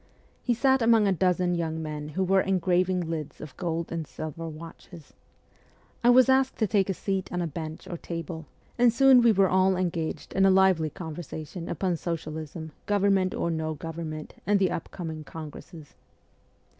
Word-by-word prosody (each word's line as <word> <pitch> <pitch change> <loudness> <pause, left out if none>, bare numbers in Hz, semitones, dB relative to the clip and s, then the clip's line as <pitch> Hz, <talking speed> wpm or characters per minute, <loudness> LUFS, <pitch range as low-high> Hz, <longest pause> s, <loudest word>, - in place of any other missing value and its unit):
He 240 - +1
sat 265 +2 +3
among 225 -2 +5
a - - +3
dozen 180 -1 +1
young 160 -2 -2
men 150 -1 -5
who 190 - +2
were 190 +1 +3
engraving 185 -1 +1
lids 155 -3 -5
of 155 -3 -9
gold 170 -2 -3
arid 165 -3 -3
silver 160 +3 -6
watches. 165 +1 -12 0.9
I 240 - +5
was 255 +1 +7
asked 265 0 +3
to 220 - +2
take 200 -1 +1
a - - +1
seat 195 0 -3
on 180 - -2
a 175 - 0
bench 160 +2 -6
or 175 -2 -5
table, 165 -1 -6 0.3
and 240 -1 +6
soon 260 +1 +6
we 235 -1 +6
were 195 -2 +4
all 185 0 +3
engaged 170 -3 -3
in 195 - +3
a 195 - +6
lively 190 -4 +4
conver 160 -2 -7
sation 160 +3 -7
upon 180 -3 -1
socialism, 160 -1 -5 0.2
government 195 -2 +2
or 170 - -1
no 160 -1 -2
government, 155 0 -6
and 205 0 +4
the 190 -2 +2 0.2
coming 160 -4 -6
congresses. 155 0 -10
175 Hz, 175 wpm, -27 LUFS, 160-195 Hz, 0.9 s, was